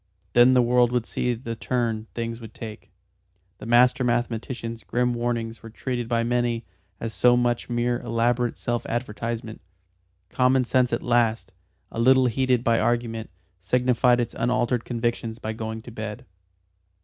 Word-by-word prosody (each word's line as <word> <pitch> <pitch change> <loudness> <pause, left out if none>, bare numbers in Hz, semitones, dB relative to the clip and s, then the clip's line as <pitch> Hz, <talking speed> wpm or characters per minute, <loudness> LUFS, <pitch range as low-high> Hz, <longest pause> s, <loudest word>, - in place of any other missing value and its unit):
Then 120 +2 +6
the 125 - +5
world 120 0 +3
would 125 -2 0
see 125 -1 -1
the 115 0 -6
turn 115 -2 -2
things 115 0 -4
would 110 - -11
take. 110 -2 -9 0.7
The - - -8
master 125 +2 +4
mathematician's 120 -1 -2
grim 125 0 0
warnings 120 -1 -2
were 115 - -10
treated 120 +1 -4
by 115 -1 +1
many 120 -1 0 0.3
as 115 -1 -4
so 120 +2 +4
much 120 -1 0
mere 120 0 0
elaborate 120 +1 0
self 120 0 -2
advertisement. 115 -1 -4 0.7
Common 130 0 +3
sense 125 0 +2
at 115 - -1
last, 120 -2 +1 0.4
a - - -5
little 130 +2 +5
heated 125 0 +1
by 115 -1 +3
argument, 115 -2 -1 0.3
signified 125 +4 +2
its 120 - -2
unalterable 120 0 0
convictions 115 -1 -2
by 110 -1 -4
going 110 0 -5
to 120 - -10
bed. 110 +2 -6
120 Hz, 150 wpm, -25 LUFS, 115-125 Hz, 0.7 s, Then